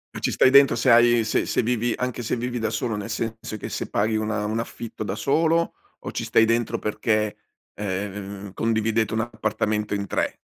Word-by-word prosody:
Ma -, -, -4 dB
ci -, -, 0 dB
stai 130 Hz, -, +4 dB
dentro 140 Hz, -3 st, +7 dB
se 120 Hz, +2 st, +3 dB
hai 120 Hz, 0 st, +6 dB
se 110 Hz, -, 0 dB
se -, -, +1 dB
vivi 120 Hz, 0 st, 0 dB
anche 125 Hz, -1 st, -3 dB
se 115 Hz, -, -1 dB
vivi 120 Hz, 0 st, -3 dB
da 110 Hz, -, 0 dB
solo, 110 Hz, 0 st, -2 dB
nel 105 Hz, +2 st, -5 dB
senso 115 Hz, 0 st, -4 dB
che -, -, -6 dB
se -, -, -4 dB
paghi 110 Hz, +2 st, +1 dB
una 110 Hz, -1 st, -1 dB
un 110 Hz, +2 st, -1 dB
affitto 115 Hz, -1 st, -6 dB
da 100 Hz, 0 st, -3 dB
solo, 165 Hz, +6 st, +1 dB, 0.2 s
o -, -, -7 dB
ci -, -, -3 dB
stai 115 Hz, -, +4 dB
dentro 115 Hz, 0 st, +1 dB
perché, 105 Hz, 0 st, 0 dB, 0.4 s
ehm, 100 Hz, 0 st, -5 dB
condividete 110 Hz, -1 st, 0 dB
un 110 Hz, -, +1 dB
appartamento 105 Hz, -2 st, -1 dB
in 100 Hz, -, -2 dB
3? -, -, -1 dB
110 Hz, 200 wpm, -24 LUFS, 105-120 Hz, 0.4 s, dentro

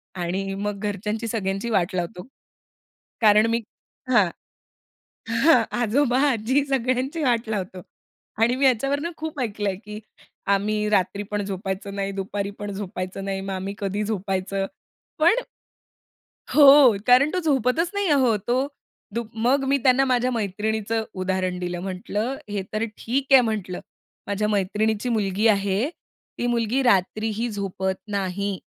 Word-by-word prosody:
आणि 185 Hz, +2 st, -2 dB
मग 205 Hz, 0 st, -3 dB
घरच्यांची 210 Hz, +2 st, -3 dB
सगळ्यांची 200 Hz, 0 st, -2 dB
वाट 190 Hz, -4 st, +1 dB
लावतो. 180 Hz, +3 st, -4 dB, 0.9 s
कारण 215 Hz, 0 st, +6 dB
मी 230 Hz, 0 st, +1 dB, 0.5 s
हां. 210 Hz, -7 st, +5 dB, 1.1 s
हां. 315 Hz, +7 st, +6 dB, 0.2 s
आजोबा, 245 Hz, +2 st, +2 dB
आजी, 260 Hz, +4 st, +1 dB
सगळ्यांची 265 Hz, +3 st, -1 dB
वाट 240 Hz, -4 st, +1 dB
लावतो. 190 Hz, -4 st, -4 dB, 0.6 s
आणि 240 Hz, +2 st, +3 dB
मी 275 Hz, -, 0 dB
याच्यावरून 275 Hz, +6 st, +1 dB
खूप 310 Hz, -2 st, -5 dB
ऐकलं 210 Hz, -4 st, -2 dB
आहे, 190 Hz, -, -2 dB
की 210 Hz, 0 st, -9 dB, 0.5 s
आम्ही 210 Hz, +1 st, 0 dB
रात्री 200 Hz, 0 st, +1 dB
पण 205 Hz, 0 st, -1 dB
झोपायचं 195 Hz, +1 st, -4 dB
नाही, 195 Hz, 0 st, -2 dB
दुपारी 200 Hz, +1 st, -3 dB
पण 205 Hz, -1 st, -5 dB
झोपायचं 190 Hz, -1 st, -5 dB
नाही, 195 Hz, -1 st, -2 dB
मग 195 Hz, 0 st, -5 dB
आम्ही 190 Hz, +1 st, -4 dB
कधी 200 Hz, +1 st, -2 dB
झोपायचं, 195 Hz, -1 st, -2 dB, 0.5 s
पण 350 Hz, +11 st, +4 dB, 1.1 s
हो, 280 Hz, -5 st, +8 dB
कारण 255 Hz, +4 st, +6 dB
तो 370 Hz, -, +1 dB
झोपतच 295 Hz, +1 st, +1 dB
नाही 405 Hz, -1 st, 0 dB
अहो. 260 Hz, -6 st, +4 dB
तो 245 Hz, +7 st, 0 dB, 0.5 s
दु 235 Hz, +1 st, -1 dB, 0.2 s
मग 270 Hz, +3 st, +3 dB
मी 280 Hz, +1 st, +3 dB
त्यांना 265 Hz, +1 st, +4 dB
माझ्या 255 Hz, -1 st, +1 dB
मैत्रिणीचं 220 Hz, +1 st, -1 dB
उदाहरण 185 Hz, -1 st, -1 dB
दिलं. 175 Hz, -1 st, -3 dB
म्हटलं, 205 Hz, +6 st, -3 dB
"हे 205 Hz, -1 st, -2 dB
तर 215 Hz, +1 st, 0 dB
ठीक 265 Hz, +4 st, -2 dB
आहे", 265 Hz, -, +9 dB
म्हटलं. 210 Hz, -6 st, -3 dB, 0.5 s
"माझ्या 205 Hz, +1 st, 0 dB
मैत्रिणीची 210 Hz, +3 st, 0 dB
मुलगी 210 Hz, -1 st, +1 dB
आहे, 200 Hz, -1 st, +2 dB
ती 245 Hz, -6 st, -9 dB
मुलगी 240 Hz, +2 st, +1 dB
रात्रीही 220 Hz, +1 st, +1 dB
झोपत 190 Hz, -2 st, -2 dB, 0.2 s
नाही." 195 Hz, 0 st, -2 dB
210 Hz, 140 wpm, -24 LUFS, 195-250 Hz, 1.1 s, आहे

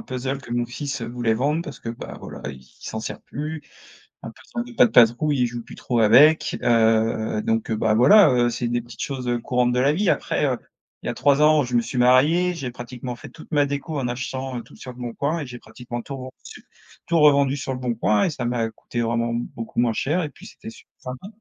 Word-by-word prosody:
puzzle 130 Hz, +1 st, -4 dB
que 130 Hz, -, -13 dB
mon 120 Hz, 0 st, 0 dB
fils 135 Hz, +1 st, -5 dB
voulait 115 Hz, -1 st, -1 dB
vendre 150 Hz, +7 st, 0 dB
parce -, -, -9 dB
que, -, -, -8 dB
bah, 115 Hz, -, -7 dB
voilà, -, -, -9 dB
il 65 Hz, -2 st, -11 dB, 0.2 s
s'en 110 Hz, -, -5 dB
sert 110 Hz, -, -6 dB
plus. 155 Hz, +2 st, -6 dB, 0.6 s
Un -, -, -6 dB
puzzle 235 Hz, 0 st, -7 dB
de -, -, -11 dB
Pat' 245 Hz, -1 st, +5 dB
Patrouille, 125 Hz, +5 st, +4 dB
il 125 Hz, -, +3 dB
joue 120 Hz, 0 st, -6 dB
plus -, -, -12 dB
trop 120 Hz, -2 st, -1 dB
avec, 135 Hz, +9 st, +5 dB
heu, 110 Hz, -2 st, +2 dB
donc, 115 Hz, 0 st, -1 dB
heu 110 Hz, -, 0 dB
bah, 110 Hz, 0 st, +1 dB
voilà, 165 Hz, -, +7 dB
heu, 120 Hz, -1 st, +3 dB
c'est 120 Hz, 0 st, -2 dB
des 120 Hz, 0 st, 0 dB
petites 120 Hz, -1 st, -11 dB
choses, 130 Hz, -3 st, -4 dB
heu, 120 Hz, 0 st, 0 dB
courantes 125 Hz, 0 st, +1 dB
de 125 Hz, -, +1 dB
la 140 Hz, +2 st, +4 dB
vie 190 Hz, +4 st, +1 dB
après, -, -, 0 dB
heu, -, -, 0 dB, 0.5 s
il -, -, -5 dB
y -, -, 0 dB
a -, -, -2 dB
3 145 Hz, +1 st, +3 dB
ans, 150 Hz, -1 st, +5 dB
je 125 Hz, -1 st, -3 dB
me 120 Hz, -, +4 dB
suis 125 Hz, -, -6 dB
marié, 150 Hz, +9 st, +4 dB
j'ai 135 Hz, -7 st, -5 dB
pratiquement 125 Hz, 0 st, -7 dB
fait -, -, -11 dB
toute 160 Hz, -, -15 dB
ma 145 Hz, -2 st, +3 dB
déco 140 Hz, +2 st, -4 dB
en 125 Hz, -, -1 dB
achetant, 130 Hz, +1 st, -4 dB
heu, -, -, -9 dB
tout -, -, -17 dB
sur 130 Hz, -, -8 dB
Leboncoin 125 Hz, +6 st, -3 dB
et -, -, -4 dB
j'ai 125 Hz, -1 st, -8 dB
pratiquement 120 Hz, +1 st, -8 dB
tout 140 Hz, -, -7 dB
revendu 130 Hz, -1 st, -11 dB, 0.4 s
tout 170 Hz, -1 st, +2 dB
revendu 140 Hz, -2 st, +4 dB
sur 130 Hz, 0 st, -4 dB
Leboncoin 115 Hz, -4 st, +1 dB
et -, -, +1 dB
ça 130 Hz, -5 st, -4 dB
m'a 120 Hz, -2 st, -1 dB
coûté 120 Hz, +2 st, -5 dB
vraiment 115 Hz, 0 st, 0 dB
beaucoup 115 Hz, -1 st, -5 dB
moins 120 Hz, -2 st, +2 dB
cher 155 Hz, +10 st, 0 dB
et 150 Hz, -, -3 dB
puis -, -, -16 dB
c'était -, -, -10 dB
super -, -, -16 dB
sympa. 125 Hz, +8 st, -8 dB
125 Hz, 235 wpm, -23 LUFS, 120-140 Hz, 0.6 s, voilà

